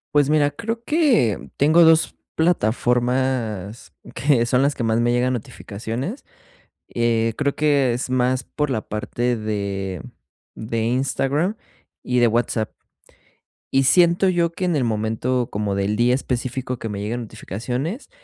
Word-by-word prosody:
Pues 145 Hz, -1 st, +4 dB
mira, 145 Hz, -1 st, +3 dB
creo 230 Hz, +9 st, -4 dB
que, 255 Hz, -, +2 dB
tengo 160 Hz, +4 st, +5 dB
2 160 Hz, 0 st, +4 dB, 0.2 s
plataformas, 120 Hz, -, 0 dB, 0.2 s
que 125 Hz, -2 st, +2 dB
son 125 Hz, +2 st, +2 dB
las 140 Hz, 0 st, +1 dB
que 120 Hz, -, -3 dB
más 115 Hz, +1 st, +1 dB
me 120 Hz, 0 st, +2 dB
llegan 125 Hz, +1 st, +1 dB
notificaciones, 120 Hz, -, -5 dB, 0.7 s
eh, 115 Hz, -1 st, +1 dB
creo 140 Hz, -1 st, 0 dB
que 140 Hz, -5 st, +2 dB
es 125 Hz, +1 st, -3 dB
más, 130 Hz, 0 st, +1 dB
por 150 Hz, +5 st, -3 dB
la 110 Hz, -4 st, 0 dB
parte 120 Hz, +3 st, -2 dB
de 100 Hz, -4 st, -3 dB, 0.5 s
de 115 Hz, 0 st, -3 dB
Instagram 135 Hz, -, 0 dB, 0.5 s
y 125 Hz, 0 st, 0 dB
de 120 Hz, -, +5 dB
WhatsApp. 115 Hz, -1 st, 0 dB, 1.0 s
Y 135 Hz, 0 st, +4 dB
siento 175 Hz, +6 st, +4 dB
yo, 170 Hz, -2 st, +1 dB
que 185 Hz, +2 st, -3 dB
en 175 Hz, -, +1 dB
el 135 Hz, -, +1 dB
momento, 115 Hz, +3 st, -1 dB
como 105 Hz, -1 st, -2 dB
del 100 Hz, +2 st, 0 dB
día 120 Hz, +2 st, +3 dB
específico, 125 Hz, -1 st, -2 dB
que 115 Hz, -, -5 dB
me 100 Hz, -1 st, -4 dB
llegan 120 Hz, +4 st, -3 dB
notificaciones, 120 Hz, -, -5 dB
125 Hz, 145 wpm, -22 LUFS, 115-145 Hz, 1.0 s, tengo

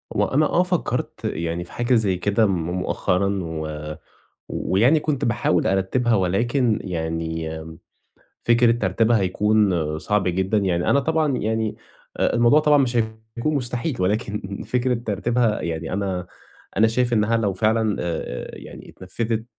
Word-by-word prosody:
هو -, -, +3 dB
أنا 150 Hz, +3 st, +2 dB
آه 175 Hz, -, +2 dB
فكّرت 180 Hz, -2 st, -1 dB
يعني 85 Hz, +1 st, -2 dB
في 85 Hz, -, -15 dB
حاجة 120 Hz, +1 st, +1 dB
زي 105 Hz, -5 st, +2 dB
كده 100 Hz, +4 st, +2 dB
م 100 Hz, -, +2 dB, 0.2 s
مؤخرًا 95 Hz, +2 st, 0 dB
و 75 Hz, -1 st, -5 dB, 0.5 s
ويعني 125 Hz, +11 st, +2 dB
كنت 145 Hz, -3 st, -1 dB
باحاول 115 Hz, -7 st, +1 dB
أرتِّبها 95 Hz, +6 st, +1 dB
ولكن 110 Hz, +5 st, +1 dB
يعني 80 Hz, -2 st, -3 dB, 0.9 s
فكرة 120 Hz, 0 st, +4 dB
ترتيبها 115 Hz, +1 st, +2 dB
هيكون 95 Hz, -5 st, +1 dB
صعب 105 Hz, +1 st, 0 dB
جدًا. 95 Hz, +4 st, +1 dB
يعني 90 Hz, -3 st, 0 dB
أنا 140 Hz, -, +4 dB
طبعًا 155 Hz, -2 st, +1 dB
يعني 110 Hz, 0 st, -1 dB, 0.4 s
آآ -, -, +1 dB
الموضوع 120 Hz, +6 st, +5 dB
طبعًا 150 Hz, -1 st, +4 dB
مش 130 Hz, -3 st, +1 dB
هيكون 110 Hz, +5 st, -2 dB
مستحيل 125 Hz, -, -1 dB
ولكن 100 Hz, 0 st, -2 dB
فكرة 125 Hz, 0 st, +1 dB
ترتيبها 115 Hz, 0 st, 0 dB
يعني 80 Hz, 0 st, -4 dB
أنا 95 Hz, -2 st, -2 dB, 0.5 s
أنا 110 Hz, +3 st, +5 dB
شايف 120 Hz, +2 st, 0 dB
إنّها 110 Hz, +1 st, +2 dB
لو 105 Hz, -3 st, 0 dB
فعلًا 110 Hz, +2 st, +1 dB
آآ 80 Hz, -7 st, -4 dB
يعني -, -, -11 dB
اتنفِّذت 110 Hz, +4 st, -3 dB
110 Hz, 140 wpm, -22 LUFS, 90-120 Hz, 0.9 s, الموضوع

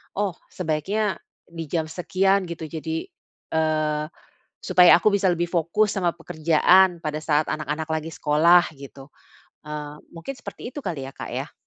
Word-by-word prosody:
Oh 200 Hz, -1 st, 0 dB, 0.2 s
sebaiknya 185 Hz, +5 st, -2 dB, 0.3 s
di 165 Hz, -1 st, -7 dB
jam 160 Hz, +2 st, -1 dB
sekian 190 Hz, +3 st, +1 dB
gitu. 170 Hz, -1 st, -7 dB
Jadi, 160 Hz, +1 st, -4 dB, 0.4 s
eee, 155 Hz, -1 st, 0 dB, 0.5 s
supaya 180 Hz, -1 st, +6 dB
aku 175 Hz, -, +1 dB
bisa 190 Hz, -2 st, +2 dB
lebih 175 Hz, 0 st, -1 dB
fokus 175 Hz, +5 st, +1 dB
sama 180 Hz, -3 st, +1 dB
pekerjaan 170 Hz, +3 st, +3 dB
pada 155 Hz, -1 st, -4 dB
saat 150 Hz, -1 st, +1 dB
anak-anak 155 Hz, +1 st, -3 dB
lagi 160 Hz, 0 st, -3 dB
sekolah 165 Hz, +4 st, +4 dB
gitu. 135 Hz, -1 st, -12 dB, 0.5 s
Eee, 150 Hz, -1 st, -7 dB
mungkin 170 Hz, +11 st, -7 dB
seperti 255 Hz, -1 st, -9 dB
itu 290 Hz, -, -6 dB
kali 160 Hz, -, -4 dB
ya 135 Hz, -, -9 dB
Kak -, -, -7 dB
ya? -, -, -5 dB
165 Hz, 150 wpm, -24 LUFS, 155-180 Hz, 0.5 s, supaya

